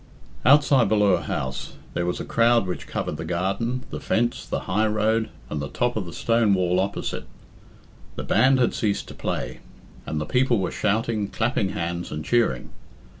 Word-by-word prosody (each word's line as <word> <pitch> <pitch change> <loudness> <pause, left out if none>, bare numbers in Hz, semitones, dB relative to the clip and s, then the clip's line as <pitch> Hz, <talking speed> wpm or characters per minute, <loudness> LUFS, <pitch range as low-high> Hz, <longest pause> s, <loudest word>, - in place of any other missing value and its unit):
XV. - - -3
Outside 135 -5 +5
Ballure 100 -5 +3
House 65 0 -3 0.2
there 85 - -1
was 90 - -1
a - - -4
crowd 115 -2 +3
which 90 - -5
covered - - -3
the - - -5
garden, 100 +8 -1
the - - -4
fence, 120 +1 0
the - - -2
high 105 +4 +1
road, 110 +1 +1 0.2
and 75 - -3
the 70 - -4
top 120 0 0
of 100 -5 -2
the - - -7
stone 115 -1 +2
wall 90 -1 +1
opposite. 100 +1 -3 0.9
The - - -4
band 130 +1 +4
had 125 -2 +2
ceased 105 -2 -1
to - - -8
play, - - -4 0.5
and 80 - -2
the 75 - -2
people 125 +4 +2
were 95 -3 -1
shouting, 105 0 0
clapping 110 -2 0
hands, 85 +1 -3
and 75 0 -5
cheering. 115 - +1
105 Hz, 180 wpm, -24 LUFS, 90-115 Hz, 0.9 s, Outside